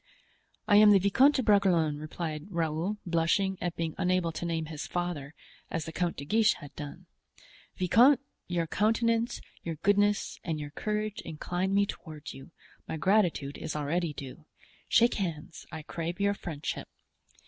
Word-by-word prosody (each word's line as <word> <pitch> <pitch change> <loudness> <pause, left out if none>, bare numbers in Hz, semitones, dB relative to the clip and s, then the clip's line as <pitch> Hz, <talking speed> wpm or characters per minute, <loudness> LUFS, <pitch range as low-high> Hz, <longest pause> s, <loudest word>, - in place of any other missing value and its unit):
"I 205 - +6
am 210 0 +8
the 205 - +8
Viscount 255 +10 +4
de 260 - +1
Bragelonne," 175 -8 +3
answered 155 0 -5
Raoul, 170 +3 -1
blushing 175 +3 +1
at 175 -1 -2
being 165 -2 -2
unable 180 -2 +1
to 165 - -5
name 165 -1 -1
his 155 -1 -6
father, 170 -5 -3 0.3
as 165 -2 -3
the 160 - -6
Count 175 0 -1
de 140 - -6
Guiche 215 +6 +3
had 145 0 -12
done. 145 -1 -8 0.7
"Viscount, 240 +9 +5 0.3
your 175 -1 0
countenance, 230 +5 +1 0.2
your 165 -1 -4
goodness 205 +4 +1
and 160 -3 -2
your 145 -1 -6
courage 210 +4 -2
incline 180 +5 -2
me 200 0 +4
toward 155 -6 -8
you; 135 - -11 0.4
my 160 - -3
gratitude 175 -6 +1
is 155 - -4
already 155 +3 -1
due. 140 +2 -9 0.4
Shake 235 +1 +5
hands—I 160 -2 -5
crave 170 +3 -4
your 200 0 +2
friendship." 160 -6 -5
175 Hz, 155 wpm, -29 LUFS, 155-200 Hz, 0.7 s, am